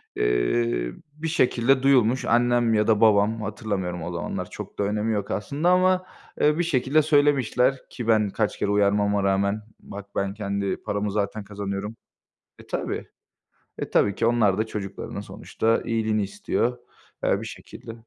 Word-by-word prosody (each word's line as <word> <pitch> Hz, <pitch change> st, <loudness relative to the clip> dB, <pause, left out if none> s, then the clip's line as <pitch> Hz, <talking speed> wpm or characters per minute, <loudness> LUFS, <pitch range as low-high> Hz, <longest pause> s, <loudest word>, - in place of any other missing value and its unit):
Eee, -, -, +1 dB, 0.2 s
bir 155 Hz, +2 st, -5 dB
şekilde 130 Hz, -4 st, +2 dB
duyulmuş. 130 Hz, -2 st, +3 dB
Annem 120 Hz, -1 st, +3 dB
ya 105 Hz, 0 st, +2 dB
da 110 Hz, -1 st, +3 dB
babam, 110 Hz, +1 st, +4 dB
hatırlamıyorum 95 Hz, -5 st, -3 dB
o 85 Hz, -, -4 dB
zamanlar, 85 Hz, -2 st, -4 dB
çok -, -, -9 dB
da -, -, +2 dB
önemi 105 Hz, +2 st, 0 dB
yok 100 Hz, -1 st, -3 dB
aslında 140 Hz, -, -1 dB
ama, 185 Hz, 0 st, +3 dB, 0.4 s
eee, 150 Hz, +1 st, +4 dB
bir 175 Hz, -, +1 dB
şekilde 150 Hz, -1 st, +2 dB
söylemişler 140 Hz, -3 st, +2 dB
ki 120 Hz, -3 st, -6 dB
ben 110 Hz, -2 st, +3 dB
kaç 105 Hz, +1 st, -2 dB
kere -, -, 0 dB
uyarmama 100 Hz, 0 st, +2 dB
rağmen 100 Hz, +2 st, +1 dB, 0.2 s
bak 100 Hz, 0 st, -9 dB
ben 100 Hz, 0 st, -1 dB
kendi 100 Hz, -2 st, -2 dB
paramı 105 Hz, 0 st, -3 dB
zaten 105 Hz, +1 st, -2 dB
kazanıyorum 100 Hz, +1 st, -5 dB, 0.7 s
E -, -, -21 dB
tabii. -, -, -4 dB, 0.7 s
E -, -, -4 dB
tabii 100 Hz, -, +3 dB
ki 115 Hz, -, 0 dB
onlar 110 Hz, -5 st, +3 dB
da 110 Hz, -, 0 dB
çocuklarının 100 Hz, -1 st, -6 dB
sonuçta 110 Hz, +3 st, -1 dB
iyiliğini 110 Hz, -2 st, 0 dB
istiyor, 105 Hz, +5 st, -1 dB, 0.5 s
eee, -, -, +2 dB
bir -, -, -6 dB
şekilde. 115 Hz, -, -10 dB
110 Hz, 155 wpm, -24 LUFS, 100-120 Hz, 0.7 s, babam